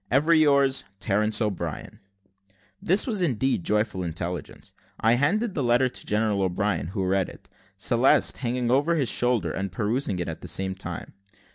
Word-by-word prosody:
"Ever 150 +6 +3
yours, 140 -4 +3 0.2
Terence 105 +1 +1
O'Brien." 105 -4 -4 0.8
This 190 +4 +3
was 215 -7 -1
indeed 130 - 0
joyful 105 -1 0
intelligence. 85 +1 -6 0.3
I 115 +1 +3
handed 200 - +1
the 145 - -2
letter 125 +1 +2
to - - -7
General 105 -1 0
O'Brien, 95 -3 -1
who 95 +1 -3
read 95 0 0
it; - - -15 0.3
Celeste - - +3
hanging 125 -1 -1
over 145 +6 +2
his 140 -6 +1
shoulder, 120 -2 +1
and 95 -1 -4
perusing 110 +2 -1
it 90 - -3
at - - -6
the - - -8
same 95 0 -1
time. 95 - -8
115 Hz, 160 wpm, -25 LUFS, 95-135 Hz, 0.8 s, Ever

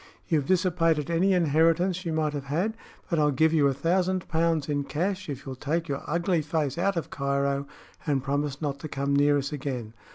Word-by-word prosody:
You've 150 -5 +1
dissipated 170 -4 +2
any 180 +4 +3
inheritance 170 +2 +2
you 165 - -1
might 155 -1 0
have 140 -2 -4
had; 175 +11 -1 0.3
but 170 -4 0
I'll 150 -1 +4
give 160 +4 +3
you 150 -3 +4
a 135 - +2
thousand 180 +5 0
pounds 165 -2 +1
in 145 -1 0
cash 185 +5 -2
if 140 -1 -6
you'll 135 - -5
take 160 +5 -2
your 140 -2 -3
ugly 170 +1 +1
face 150 0 -1
out 195 0 +1
of 165 - -3
Cairo 140 0 -1 0.4
and 140 -3 +1
promise 145 +1 -2
not 140 -1 -2
to 155 - -6
come 140 -1 -1
near 145 0 +4
us 140 +1 -3
again. 130 -6 -4
155 Hz, 200 wpm, -27 LUFS, 140-170 Hz, 0.4 s, I'll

